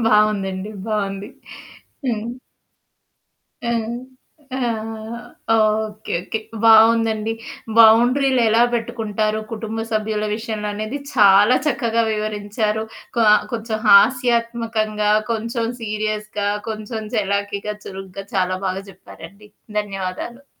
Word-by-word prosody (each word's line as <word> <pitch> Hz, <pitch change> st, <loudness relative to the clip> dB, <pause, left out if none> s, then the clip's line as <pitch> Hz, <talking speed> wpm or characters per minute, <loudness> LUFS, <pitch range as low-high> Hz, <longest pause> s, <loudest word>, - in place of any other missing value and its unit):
బావుందండి. 210 Hz, -2 st, +2 dB, 0.2 s
బావుంది. 200 Hz, -2 st, -2 dB, 0.8 s
హ్మ్. 225 Hz, -2 st, -1 dB, 1.4 s
హ్మ్. 230 Hz, -1 st, -1 dB, 0.6 s
ఆ! -, -, -2 dB, 1.0 s
Okay 215 Hz, 0 st, 0 dB
okay. 220 Hz, -, -3 dB, 0.2 s
బావుందండి. 225 Hz, 0 st, +5 dB, 0.5 s
బౌండరీలెలా 235 Hz, 0 st, +5 dB
పెట్టుకుంటారు 220 Hz, -2 st, -1 dB
కుటుంబ 225 Hz, 0 st, -4 dB
సభ్యుల 215 Hz, 0 st, -1 dB
విషయంలో 215 Hz, -2 st, -4 dB
అనేది 215 Hz, +6 st, -4 dB, 0.2 s
చాలా 205 Hz, +2 st, +6 dB
చక్కగా 230 Hz, -5 st, +1 dB
వివరించారు. 215 Hz, 0 st, -2 dB, 0.3 s
క -, -, 0 dB, 0.3 s
కొంచెం 220 Hz, -1 st, -2 dB
హాస్యాత్మకంగా, 230 Hz, -1 st, +3 dB, 0.2 s
కొంచెం 230 Hz, +1 st, -1 dB
సీరియస్‌గా, 215 Hz, -1 st, -2 dB, 0.2 s
కొంచెం 220 Hz, +1 st, -4 dB
చలాకీగా, 205 Hz, 0 st, -1 dB
చురుగ్గా 195 Hz, 0 st, -8 dB
చాలా 185 Hz, -1 st, +1 dB
బాగా 190 Hz, +1 st, -2 dB
చెప్పారండి. 200 Hz, +2 st, -14 dB, 0.3 s
ధన్యవాదాలు. 205 Hz, +6 st, -5 dB
215 Hz, 85 wpm, -21 LUFS, 210-230 Hz, 1.4 s, చాలా